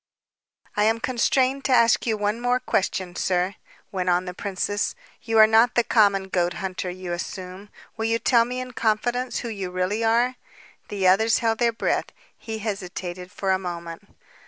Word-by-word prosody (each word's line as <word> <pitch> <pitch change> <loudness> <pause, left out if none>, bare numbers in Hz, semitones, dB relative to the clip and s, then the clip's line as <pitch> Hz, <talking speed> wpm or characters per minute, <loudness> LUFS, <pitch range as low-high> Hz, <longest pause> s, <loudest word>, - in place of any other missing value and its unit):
"I 210 - +2
am 225 +1 +2
constrained 260 +3 +1
to 265 - +1
ask 235 -1 +4
you 220 -2 +1
one 210 +3 -1 0.2
question, 185 -2 -1
sir," 180 +1 0 0.4
went 185 -2 -1
on 180 +1 +2
the 180 - -5
princess. 200 +2 -2 0.3
"You 225 -1 -1
are 220 - +9
not 225 +2 +4
the 240 - +4
common 200 -4 +3
goat 175 -1 0
hunter 185 -1 -4
you 180 -1 -5
assume. 185 +3 -7 0.3
Will 220 - -2
you 225 0 +2
tell 235 0 +4
me 250 +2 -4
in 255 0 -6
confidence 240 +3 -1
who 235 - -5
you 195 -4 -4
really 185 +5 -1
are?" 240 +3 +2 0.5
The 195 -2 0
others 220 +5 +4
held 225 -1 0
their 235 -1 +3
breath. 225 - -1 0.3
He 220 -1 -6
hesitated 185 -3 -5
for 195 -2 -1
a 190 - +2
moment. 170 +1 -7
205 Hz, 175 wpm, -24 LUFS, 185-230 Hz, 0.5 s, are